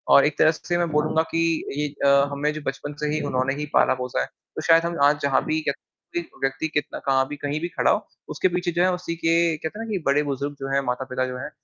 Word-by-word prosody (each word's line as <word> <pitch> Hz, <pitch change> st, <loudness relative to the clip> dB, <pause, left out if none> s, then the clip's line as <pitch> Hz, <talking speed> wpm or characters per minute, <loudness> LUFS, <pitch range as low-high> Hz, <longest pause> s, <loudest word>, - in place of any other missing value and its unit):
और 140 Hz, -, +7 dB
एक 150 Hz, -, 0 dB
तरह 155 Hz, -, +6 dB
से 175 Hz, +2 st, -3 dB
मैं 175 Hz, -1 st, 0 dB
बोलूँगा 155 Hz, +1 st, +2 dB
कि 165 Hz, -, +1 dB, 0.4 s
ये 150 Hz, 0 st, 0 dB, 0.2 s
अ, 140 Hz, 0 st, +5 dB
हमें 145 Hz, +2 st, 0 dB
जो 155 Hz, -, -6 dB
बचपन 145 Hz, +2 st, -4 dB
से -, -, +1 dB
ही 155 Hz, -, 0 dB
उन्होंने 130 Hz, +1 st, +1 dB
ही 150 Hz, +1 st, -3 dB
पाला-पोसा 125 Hz, -, +2 dB
है, -, -, 0 dB, 0.3 s
तो -, -, -3 dB
शायद 165 Hz, 0 st, +5 dB
हम 170 Hz, 0 st, -2 dB
आज 145 Hz, +1 st, +4 dB
जहाँ 140 Hz, -1 st, +2 dB
भी 155 Hz, 0 st, 0 dB
कह 140 Hz, -, +1 dB, 0.4 s
एक 170 Hz, -, -3 dB
व्यक्ति 135 Hz, +4 st, 0 dB
कितना 150 Hz, -2 st, -3 dB
कहाँ 135 Hz, -1 st, +3 dB
भी 145 Hz, -, -6 dB
कहीं 145 Hz, +1 st, -2 dB
भी 170 Hz, -, -1 dB
खड़ा -, -, +2 dB
हो -, -, 0 dB, 0.2 s
उसके -, -, +1 dB
पीछे 180 Hz, 0 st, -1 dB
जो 175 Hz, +1 st, 0 dB
है 185 Hz, -, +3 dB
उसी 180 Hz, -2 st, -4 dB
के 165 Hz, 0 st, 0 dB, 0.3 s
कहते 160 Hz, +8 st, -6 dB
हैं 225 Hz, -, -4 dB
ना -, -, -8 dB
कि 200 Hz, -, 0 dB
बड़े 140 Hz, +2 st, +3 dB
बुज़ुर्ग 140 Hz, 0 st, -3 dB
जो 135 Hz, -, -4 dB
हैं, 140 Hz, -, +3 dB
माता-पिता 130 Hz, +1 st, -2 dB
जो 125 Hz, 0 st, -5 dB
हैं 130 Hz, -, -5 dB
150 Hz, 265 wpm, -24 LUFS, 135-165 Hz, 0.4 s, और